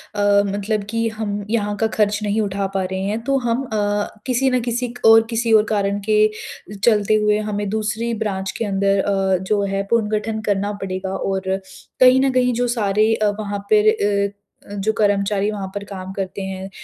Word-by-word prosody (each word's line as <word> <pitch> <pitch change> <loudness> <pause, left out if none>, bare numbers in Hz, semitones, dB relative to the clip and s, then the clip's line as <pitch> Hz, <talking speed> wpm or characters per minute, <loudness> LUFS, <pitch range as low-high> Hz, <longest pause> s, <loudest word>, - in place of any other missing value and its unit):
अ, 205 0 +3
मतलब 205 +1 -2
कि 230 +1 0
हम 210 -2 -4
यहाँ 210 -2 0
का 225 - +1
खर्च 210 -1 +2
नहीं 210 +1 0
उठा 200 -1 -2
पा 190 - +1
रहे 190 - -2
हैं 210 +3 -1
तो 275 +2 +1
हम 235 +3 0
अ, 205 -2 -1 0.2
किसी 265 +1 +1
न 255 -1 +1
किसी 240 +1 -2
क - - -21
और 225 0 +8
किसी 230 -1 0
और 215 - +6
कारण 200 -1 0
के 215 0 +4 0.5
चलते 215 -2 +3
हुए 210 0 +2
हमें 205 0 -2
दूसरी 220 +2 -2
ब्रांच 195 -4 -3
के 230 - -2
अंदर 195 0 +1
अ, 195 -1 +1
जो 205 +1 0
है 195 0 -1
पुनर्गठन 220 -1 0
करना 205 -1 -1
पड़ेगा। 190 0 -4
और 190 0 -1 0.4
कहीं 255 0 +7
न 270 -1 +2
कहीं 250 -1 +2
जो 245 +1 0
सारे 215 -2 +2
अ, 215 -1 +1
वहाँ 205 -1 -4
पर 215 0 +5
अ 205 -2 +1 0.4
अ, - - -6
जो 205 +2 0
कर्मचारी 205 0 +1
वहाँ 200 -2 -5
पर 200 - -5
काम 190 -1 -7
करते 195 0 -4
हैं 190 0 -5
210 Hz, 195 wpm, -20 LUFS, 200-220 Hz, 0.5 s, और